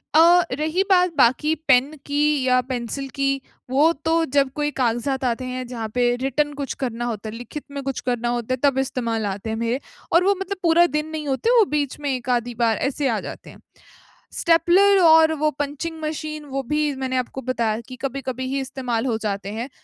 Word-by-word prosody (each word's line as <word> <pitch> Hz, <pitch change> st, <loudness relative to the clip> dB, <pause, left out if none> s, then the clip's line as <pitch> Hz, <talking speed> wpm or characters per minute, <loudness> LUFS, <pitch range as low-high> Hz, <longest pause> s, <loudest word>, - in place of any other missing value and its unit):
अ, 345 Hz, +2 st, +7 dB
रही 315 Hz, +7 st, 0 dB
बात 360 Hz, -2 st, +4 dB
बाकी 275 Hz, +5 st, +3 dB, 0.2 s
पेन 275 Hz, +3 st, +4 dB
की 290 Hz, +1 st, -1 dB, 0.2 s
या 255 Hz, 0 st, +4 dB
पेंसिल 255 Hz, +2 st, -3 dB
की 275 Hz, 0 st, +1 dB, 0.4 s
वो 290 Hz, +5 st, +4 dB
तो 325 Hz, 0 st, +3 dB
जब 275 Hz, -2 st, +3 dB
कोई 295 Hz, 0 st, -1 dB
काग़ज़ात 255 Hz, +2 st, 0 dB
आते 250 Hz, +1 st, -1 dB
हैं 255 Hz, 0 st, -4 dB
जहाँ 230 Hz, -3 st, -5 dB
पे 245 Hz, 0 st, +2 dB
रिटन 290 Hz, +2 st, 0 dB
कुछ 280 Hz, -1 st, -4 dB
करना 240 Hz, -1 st, -2 dB
होता 220 Hz, -2 st, -4 dB
है, 215 Hz, -, -8 dB
लिखित 245 Hz, +5 st, -7 dB
में 280 Hz, -1 st, -5 dB
कुछ 270 Hz, -1 st, -3 dB
करना 240 Hz, -1 st, -1 dB
होता 240 Hz, +1 st, -1 dB
है -, -, -1 dB
तब 275 Hz, -2 st, +3 dB
इस्तेमाल 235 Hz, -4 st, -2 dB
आते 205 Hz, +3 st, -4 dB
हैं 220 Hz, -, -2 dB
मेरे। 235 Hz, +3 st, -1 dB, 0.3 s
और 340 Hz, +2 st, +5 dB
वो 400 Hz, +1 st, +4 dB
मतलब 395 Hz, +1 st, -4 dB
पूरा 340 Hz, +1 st, +5 dB
दिन 300 Hz, 0 st, -2 dB
नहीं 305 Hz, -2 st, -5 dB
होते 270 Hz, -, 0 dB
वो 430 Hz, -, +6 dB
बीच 290 Hz, -1 st, -1 dB
में 285 Hz, -, -2 dB
1 250 Hz, 0 st, -6 dB
आधी 245 Hz, -1 st, 0 dB
बार 230 Hz, -2 st, +1 dB
ऐसे 280 Hz, 0 st, -2 dB
आ 220 Hz, -, 0 dB
जाते -, -, -9 dB
हैं। -, -, -16 dB, 0.8 s
स्टेपलर 365 Hz, +4 st, +4 dB
और 320 Hz, -2 st, +6 dB
वो 305 Hz, -, +3 dB
पंचिंग 295 Hz, +3 st, -4 dB
मशीन 305 Hz, 0 st, -4 dB
वो 275 Hz, -1 st, -3 dB
भी 300 Hz, -1 st, 0 dB
मैंने 260 Hz, -1 st, -2 dB
आपको 255 Hz, +1 st, -3 dB
बताया 230 Hz, -3 st, 0 dB
कि 255 Hz, -, -8 dB
कभी-कभी 260 Hz, -1 st, -4 dB
ही 275 Hz, -, 0 dB
इस्तेमाल 255 Hz, -3 st, -3 dB
हो 225 Hz, -3 st, 0 dB
जाते 200 Hz, -1 st, -3 dB
हैं। 235 Hz, +4 st, -4 dB
270 Hz, 205 wpm, -22 LUFS, 240-305 Hz, 0.8 s, अ